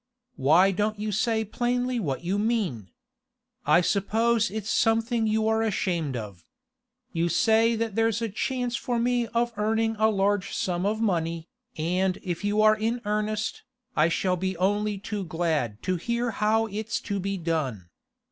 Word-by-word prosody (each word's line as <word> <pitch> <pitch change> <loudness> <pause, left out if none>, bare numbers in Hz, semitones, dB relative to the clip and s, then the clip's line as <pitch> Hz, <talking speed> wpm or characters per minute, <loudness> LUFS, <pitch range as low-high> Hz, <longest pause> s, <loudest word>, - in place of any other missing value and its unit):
Why 165 +7 +4
don't 210 +3 -1
you 210 0 -2
say 220 +1 +1
plainly 245 +3 -1
what 145 -7 -3
you 190 +4 0
mean? 205 - -1 0.8
I 175 - +6
suppose 225 +4 +1
it's 215 0 -5
something 225 0 +2
you 220 0 +1
are 220 0 +2
ashamed 170 - -1
of. 100 -6 -8 0.7
You 170 0 +1
say 225 +5 +3
that 225 -1 -2
there's 225 0 +1
a 230 - -1
chance 245 +3 -2
for 240 0 -2
me 240 0 +1
of 235 0 0
earning 225 +1 +1
a 220 0 +4
large 200 -1 0
sum 180 +1 -1
of 215 +2 -1
money, 165 -5 -1 0.3
and 180 +4 0
if 175 0 -4
you 205 +1 +2
are 215 0 +6
in 225 +3 -1
earnest, 215 +1 -1 0.3
I 155 +2 +4
shall 180 +2 0
be 190 0 -2
only 205 +3 0
too 205 +1 -4
glad 160 - -2
to 185 -1 0
hear 235 +5 -1
how 220 +1 +2
it's 215 +1 -3
to 200 -2 -3
be 195 +1 -2
done. 140 - -3
210 Hz, 165 wpm, -26 LUFS, 175-225 Hz, 0.8 s, I